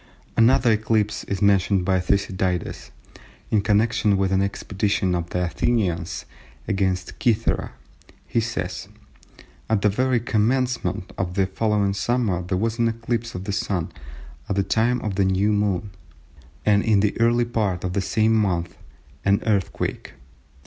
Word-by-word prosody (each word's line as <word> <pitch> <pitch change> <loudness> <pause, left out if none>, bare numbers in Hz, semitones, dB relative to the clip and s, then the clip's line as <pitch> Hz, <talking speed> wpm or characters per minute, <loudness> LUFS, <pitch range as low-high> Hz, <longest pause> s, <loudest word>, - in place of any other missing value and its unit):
'" - - -31
Another 120 +1 +4
eclipse 110 -1 0
is 100 0 -2
mentioned 100 -1 +3
by 95 -1 +2
Thucydides 95 -1 -1 0.6
in 105 - +3
connection 105 0 +2
with 95 0 +1
an 95 0 +2
expedition 100 -1 -1
of 85 -1 -2
the 90 - -1
Athenians 90 -2 -1 0.4
against 95 -3 -1
Cythera. 115 -2 +1 0.5
He - - 0
says:—"At 105 0 -5
the 105 - +5
very 125 +4 +1
commencement 120 -2 0
of 90 -1 -2
the 95 -1 +3
following 100 0 0
summer 110 -4 0
there 90 +1 -2
was 115 +3 -1
an 115 - +3
eclipse 115 0 -3
of 90 - -4
the 100 - -3
Sun 95 -4 -2 0.6
at 100 - 0
the 100 - +2
time 115 +5 +1
of 100 -3 -3
a - - +5
new 95 +3 +2
moon, 100 -1 0 0.7
and 105 -1 +4
in 105 -2 +3
the 105 0 +1
early 120 +1 +3
part 105 -6 -1
of 90 -1 -2
the 100 - 0
same 110 +3 +2
month 90 -6 0 0.5
an 100 0 +3
earthquake." 100 -5 -1
100 Hz, 150 wpm, -23 LUFS, 95-110 Hz, 0.7 s, the